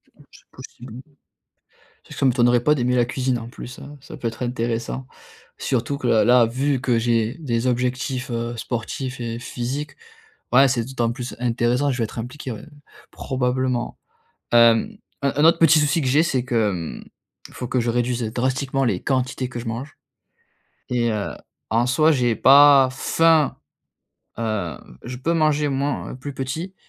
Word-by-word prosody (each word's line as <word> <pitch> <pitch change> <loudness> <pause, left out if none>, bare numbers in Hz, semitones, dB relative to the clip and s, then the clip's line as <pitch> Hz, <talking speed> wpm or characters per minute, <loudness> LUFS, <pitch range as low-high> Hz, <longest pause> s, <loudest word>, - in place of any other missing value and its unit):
Oui, - - -20
c'est - - -20
possible, 120 -2 -12
hein. 145 +4 -14 0.9
Tu - - -14
sais, - - -9
ça 135 - +2
m'étonnerait 120 -1 +3
pas 150 - +4
d'aimer 125 -3 0
la 120 -1 +3
cuisine 125 0 -1
en 115 0 -8
plus 125 +1 -10
hein, 145 +1 -10
ça 150 +4 -11
peut 125 -5 -3
être 115 +2 -7
intéressant. 120 +1 -3 0.5
Surtout 130 +3 -1
que 130 - -3
là 110 - +4
là 120 -1 +5
vu 130 +3 -1
que 125 -3 +1
j'ai 115 0 +1
des 120 -6 -2
objectifs, 125 +1 -1
heu, 115 0 -3
sportifs 125 +3 -4
et 115 -1 -4
physiques. 130 +5 -5 0.6
Ouais 135 +3 +6
c'est 120 -3 0
d'autant 120 -2 -1
plus 125 +1 -6
intéressant, 125 +3 +1
je 125 - -3
vais 115 - 0
être 110 - -10
impliqué 130 +3 -6
ouais, 110 - -8 0.5
probablement. 130 -1 -2 0.5
Hem, 115 - +4 0.3
un 140 - +1
un 145 - +2
autre 165 - +6
petit 160 -1 +6
souci 150 +2 +2
que 135 - -1
j'ai, 145 +5 +4
c'est 130 -7 0
que, 115 -5 +1
mmh, 85 -4 -6 0.5
il - - -18
faut 125 - -6
que 130 - 0
je 120 0 -1
réduise, 120 0 0
heu, 110 - -3
drastiquement 130 +2 -1
les 100 -7 0
quantités 130 -1 -1
que 120 - -6
je 120 - -8
mange 120 +7 -6 0.9
et 120 -1 +1
heu, 105 -2 -2 0.4
en 115 +3 +2
soi 155 +5 +4
j'ai 125 -5 +1
pas 140 0 +7
faim, 160 +3 +2 0.8
heu, 110 -7 -2 0.3
je 125 +1 -6
peux 165 +7 -1
manger 155 -2 +2
moins 140 +1 -2
plus 140 +2 -7
petit, 145 +8 -5
125 Hz, 180 wpm, -22 LUFS, 120-135 Hz, 0.9 s, pas